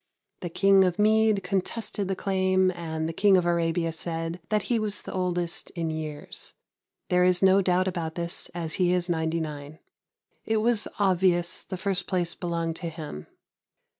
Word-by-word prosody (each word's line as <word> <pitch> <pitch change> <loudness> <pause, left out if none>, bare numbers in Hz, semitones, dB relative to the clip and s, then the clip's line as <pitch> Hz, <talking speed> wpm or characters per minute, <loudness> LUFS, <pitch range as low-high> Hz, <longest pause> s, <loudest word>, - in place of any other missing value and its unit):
The 175 - -5
King 195 +2 +4
of 180 -2 0
Mede 215 -1 +3
contested 195 +2 -2
the 195 - -1
claim, 185 -1 +1
and 160 -2 -4
the 165 - -4
King 195 +2 +4
of 180 - +1
Arabia 170 -1 +1
said 165 +1 -4
that 210 -2 +1
he 235 -2 0
was 210 -3 -3
the - - -7
oldest 175 -2 -2
in 165 -2 -2
years. 155 -2 -6 0.5
There 180 0 +3
is 180 0 +4
no 190 +1 +6
doubt 185 0 +2
about 165 -3 -3
this, 170 0 -3
as 165 -2 -3
he 180 0 +3
is 180 0 0
99. 160 -3 -3 0.7
It 220 - 0
was 220 0 +2
obvious 180 -3 +2
the 185 - -6
first 190 -1 0
place 175 -3 0
belonged 165 -2 -3
to 170 - -4
him. 155 - -8
180 Hz, 165 wpm, -26 LUFS, 165-190 Hz, 0.7 s, no